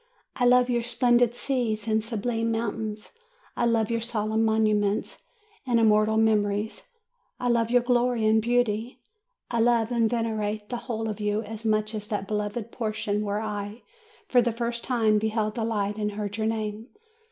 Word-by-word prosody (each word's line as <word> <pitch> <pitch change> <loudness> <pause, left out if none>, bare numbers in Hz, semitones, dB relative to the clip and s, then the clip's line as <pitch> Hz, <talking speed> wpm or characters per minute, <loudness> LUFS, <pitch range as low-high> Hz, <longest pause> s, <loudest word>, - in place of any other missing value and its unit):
I 250 - +1
love 250 0 +5
your 240 -1 +1
splendid 240 0 +2
seas 235 -5 -2
and 220 0 +1
sublime 230 0 -2
mountains; 220 -2 -3 0.4
I 240 - +1
love 230 -2 +1
your 230 0 0
solemn 220 -1 0
monuments 215 -2 +1 0.4
and 240 -3 +2
immortal 215 0 +4
memories; 215 - +1 0.5
I 245 - 0
love 230 -1 +2
your 245 0 +3
glory 245 -2 +2
and 220 0 +4
beauty; 240 +1 0 0.5
I 235 - 0
love 230 0 +3
and 230 -2 +2
venerate 215 -3 -2
the 245 - -2
whole 225 -2 -4
of 215 0 -4
you 210 +1 0
as 225 +1 -8
much 215 0 +1
as 210 -1 -5
that 205 -2 -3
beloved 210 +2 -3
portion 215 -2 -2
where 205 +1 -2
I, 210 +1 -5 0.4
for 245 - +4
the 240 0 +1
first 235 +1 -3
time, 220 -4 +2
beheld 215 0 -1
the 230 - -3
light 210 -2 -1
and 210 -1 -2
heard 205 0 -4
your 220 -1 -1
name. 220 0 -3
220 Hz, 170 wpm, -26 LUFS, 215-235 Hz, 0.5 s, love